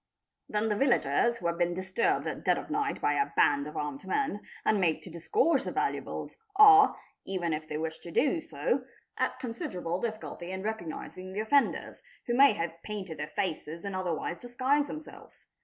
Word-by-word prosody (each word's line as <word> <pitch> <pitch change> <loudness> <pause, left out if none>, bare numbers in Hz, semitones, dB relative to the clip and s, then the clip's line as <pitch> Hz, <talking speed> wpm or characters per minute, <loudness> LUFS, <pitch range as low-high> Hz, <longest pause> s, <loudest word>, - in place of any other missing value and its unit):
'Then 210 +1 0
the 210 - +1
villagers 235 - +2
who 175 - -10
have 170 0 0
been 175 0 +1
disturbed 190 +5 0
at - - -4
dead - - +3
of - - -6
night 420 0 0
by - - +2
a 420 - +1
band 145 0 +3
of 150 - -7
armed 145 -2 -4
men, 205 0 0 0.2
and 210 -2 +3
made 165 -3 +2
to 180 - -10
disgorge 260 - +2
their - - -4
valuables, - - -2 0.2
are, 415 0 +8 0.2
even 175 -4 -2
if 155 0 -4
they 150 - -3
wish 160 0 -4
to 175 - -10
do 295 - +2
so, - - -1 0.4
at - - 0
considerable 185 - -4
difficulty 215 -6 -5
in 190 0 -4
recognising 185 -2 -5
the 200 - -3
offenders, 275 +6 +1 0.2
who 240 - -1
may 275 0 +7
have 165 -3 -4
painted 190 -7 -6
their 150 - -3
faces 165 -1 -3
and 200 -1 -3
otherwise 175 -2 -2
disguised 260 +4 +1
themselves. 305 +2 -10
190 Hz, 185 wpm, -30 LUFS, 170-240 Hz, 0.4 s, are